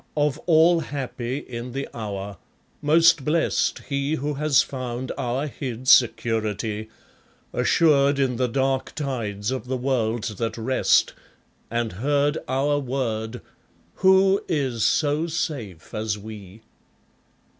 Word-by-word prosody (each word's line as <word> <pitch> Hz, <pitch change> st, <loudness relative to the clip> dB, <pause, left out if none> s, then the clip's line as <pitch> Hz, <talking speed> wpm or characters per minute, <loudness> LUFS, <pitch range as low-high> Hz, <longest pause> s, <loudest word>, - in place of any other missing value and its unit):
of 145 Hz, -2 st, +1 dB
all 165 Hz, +1 st, +5 dB
happy 130 Hz, -4 st, -4 dB
in 125 Hz, -3 st, -7 dB
the 135 Hz, +1 st, -3 dB
hour, 100 Hz, -3 st, -5 dB, 0.4 s
most 165 Hz, 0 st, +5 dB
blest 160 Hz, +4 st, 0 dB
He 140 Hz, +2 st, -1 dB
who 150 Hz, 0 st, -2 dB
has 145 Hz, -1 st, +3 dB
found 130 Hz, -1 st, -5 dB
our 130 Hz, +1 st, -2 dB
hid 130 Hz, -3 st, -6 dB
security, 110 Hz, -3 st, +2 dB, 0.6 s
Assured 140 Hz, -3 st, +3 dB
in 130 Hz, -3 st, 0 dB
the 125 Hz, 0 st, +1 dB
dark 135 Hz, +2 st, -1 dB
tides 115 Hz, -7 st, -3 dB
of 130 Hz, -2 st, -4 dB
the 130 Hz, 0 st, -1 dB
world 120 Hz, -4 st, 0 dB, 0.2 s
that 115 Hz, -1 st, -2 dB
rest, 130 Hz, +3 st, +2 dB, 0.6 s
And 115 Hz, -1 st, -1 dB
heard 145 Hz, +8 st, 0 dB
our 140 Hz, +3 st, +1 dB
word, 120 Hz, -4 st, -3 dB, 0.6 s
'Who 190 Hz, +1 st, +4 dB
is 130 Hz, -7 st, -1 dB
so 150 Hz, +2 st, +2 dB
safe 135 Hz, -, -4 dB
as 110 Hz, -1 st, -2 dB
we?' 105 Hz, 0 st, -11 dB
130 Hz, 120 wpm, -24 LUFS, 115-145 Hz, 0.6 s, all